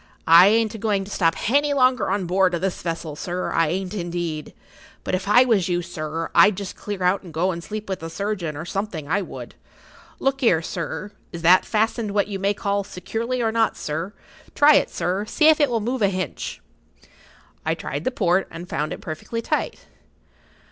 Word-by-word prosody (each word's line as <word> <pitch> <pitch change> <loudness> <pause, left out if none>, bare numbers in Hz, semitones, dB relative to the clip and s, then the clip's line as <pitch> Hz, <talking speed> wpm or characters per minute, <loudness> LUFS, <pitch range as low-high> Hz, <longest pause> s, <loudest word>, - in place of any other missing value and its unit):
I 170 +3 +9
ain't 220 +1 +2
a 220 - -7
going 205 -2 0
to 200 - -11
stop 165 -4 +2
hany 285 +5 +1
longer 255 -4 +3
on 195 -1 0
board 185 0 +2
o' - - 0
this 190 +1 -3
vessel, 165 -2 -4
sir; 180 +4 -3
I 165 -1 +2
ain't, 185 +4 -3
indeed. 170 -5 -4 0.5
But - - -4
if 185 +1 -1
I 245 +5 +6
was 205 -8 +2
you, 175 0 0
sir, 165 -1 -5
I'd 205 -2 +6
just 200 -2 -6
clear 205 -3 -5
out 180 +2 +2
and 175 - -11
go 170 +4 0
and 170 -1 -6
sleep 215 +2 -6
with 190 -1 -3
the 165 - -6
surgeon, 180 -4 -3
or 160 - -6
something, 180 -5 -4
I 190 +6 +1
would. 185 - -8 0.6
Look 270 0 -1
'ere, 180 -10 +3
sir, 185 +4 -5 0.2
is 170 -1 -7
that 180 +3 +6
fastened 220 -1 0
what 205 - +2
you 200 -2 -4
may 200 +1 +1
call 200 0 -1
securely, 230 +6 -3
or 225 - +1
not, 225 0 +1
sir? 160 +6 -4 0.4
Try 295 +1 +7
it, - - +1
sir, 185 +3 -2
see 305 +7 +4
if 315 - +5
it 290 -2 +3
will 235 -2 0
move 245 +3 -2
a 200 - +4
hinch." 185 -7 -4 1.0
I - - 0
tried 145 +2 -5
the - - +1
port, 190 -6 +1
and 165 +2 -9
found 150 -2 -2
it - - -9
perfectly 230 +9 -5
tight. - - -2
190 Hz, 205 wpm, -23 LUFS, 170-215 Hz, 1.0 s, I